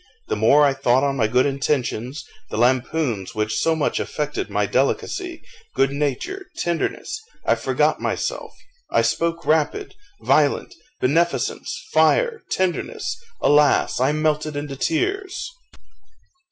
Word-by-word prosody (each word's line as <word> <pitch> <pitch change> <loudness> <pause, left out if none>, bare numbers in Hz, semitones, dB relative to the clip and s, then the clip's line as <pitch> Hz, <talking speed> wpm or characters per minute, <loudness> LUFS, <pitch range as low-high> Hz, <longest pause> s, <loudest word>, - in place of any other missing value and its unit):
The - - +1
more 130 +8 +5
I 140 - +3
thought 130 0 +2
on 140 -1 +1
my 110 -3 +2
good 125 +3 +3
intentions, 135 -1 -1 0.2
the - - -4
lampoons 125 - 0
which 110 0 -1
so 165 0 +2
much 155 - 0
affected 150 -1 -3
my - - +1
delicacy, 355 -4 -1 0.3
good 135 0 +3
nature, 150 - -3
tenderness 175 - -2 0.2
I - - +4
forgot - - +1
myself - - -2 0.4
I - - +2
spoke 165 0 0
rapid, 160 - +1 0.3
violent - - +2 0.3
beneficence 170 - 0
fire 475 -2 +3
tenderness 185 -2 -1 0.3
alas! 145 -3 +4
I 130 +3 +3
melted 155 0 0
into 145 -1 -4
tears! 390 - -1
150 Hz, 125 wpm, -22 LUFS, 130-170 Hz, 0.4 s, more